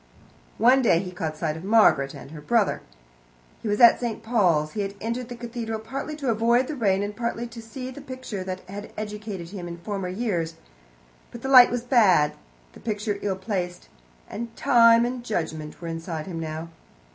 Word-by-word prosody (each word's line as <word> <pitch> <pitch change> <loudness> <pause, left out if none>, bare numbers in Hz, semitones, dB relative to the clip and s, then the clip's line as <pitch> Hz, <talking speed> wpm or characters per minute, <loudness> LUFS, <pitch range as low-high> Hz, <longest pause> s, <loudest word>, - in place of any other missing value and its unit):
One 255 +3 +5
day 220 -9 +4
he 180 +1 -3
caught 160 -3 -4
sight 155 -1 -2
of 160 - -8
Margaret 195 -10 +4
and - - -11
her 155 -2 -9
brother. 215 +6 +1 0.8
He - - -5
was 205 0 0
in 235 -2 +9
St. 235 -3 -4
Paul's. 180 -10 +2
He 210 - -2
had 200 0 -4
entered 235 +2 -3
the 245 - -6
cathedral 235 -2 -4
partly 270 +7 -5
to 280 -4 -3
avoid 235 +3 +3
the 305 - -5
rain 200 -6 +1
and 205 0 -4
partly 235 +1 -2
to 230 0 -9
see 250 +3 -7
a 260 - -7
picture 255 -7 -6
that 185 0 -5
had 200 +3 -9
educated 210 -4 -6
him 185 -3 -7
in 170 0 -7
former 195 +1 -4
years. 180 -6 -2 0.7
But 235 - -11
the 265 - -2
light 255 -2 +9
was 245 -1 -2
bad, 205 - +4 0.4
the - - -13
picture 210 -1 -3
ill 195 -2 -1
placed, 185 -3 -4 0.4
and 230 0 -6
Time 230 0 +5
and 245 0 -4
Judgment 160 -8 -4
were 170 - -7
inside 165 -1 -5
him 175 -3 -5
now. 160 +1 -5
210 Hz, 190 wpm, -25 LUFS, 175-235 Hz, 0.8 s, in